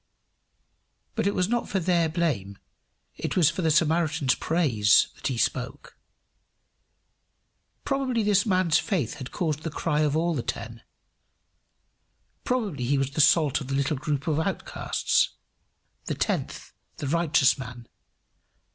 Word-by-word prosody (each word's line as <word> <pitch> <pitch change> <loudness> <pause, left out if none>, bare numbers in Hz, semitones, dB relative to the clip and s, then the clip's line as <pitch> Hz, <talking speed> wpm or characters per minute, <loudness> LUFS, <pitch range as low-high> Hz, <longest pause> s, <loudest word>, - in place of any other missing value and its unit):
But - - 0
it 200 - 0
was 180 - +1
not 240 +2 -1
for 195 - 0
their 170 -2 +1
blame, 145 - -2 0.6
it - - -3
was 170 -3 +5
for 180 - -4
the 165 - +1
Samaritan's 155 -3 +2
praise 125 - +3
that - - -5
he 130 - -2
spoke. 125 +2 -3 1.9
Probably 265 -4 0
this 205 -1 +3
man's 185 -6 +2
faith 165 - -2
had 130 -2 -6
caused 155 -4 -2
the 165 - -4
cry 150 0 -1
of 150 0 +1
all 170 +1 +1
the 135 - -2
ten; 115 0 -6 1.6
probably 205 - -1
he 140 +3 +1
was 135 0 -1
the 155 - +1
salt 145 0 +4
of 135 - -7
the 135 - -2
little 140 +2 0
group 140 0 -3
of 155 -1 +1
outcasts 160 - 0 0.7
the - - -2
tenth, - - -3 0.2
the - - -5
righteous 155 -3 +3
man. 125 -2 -9
155 Hz, 140 wpm, -26 LUFS, 135-175 Hz, 1.9 s, was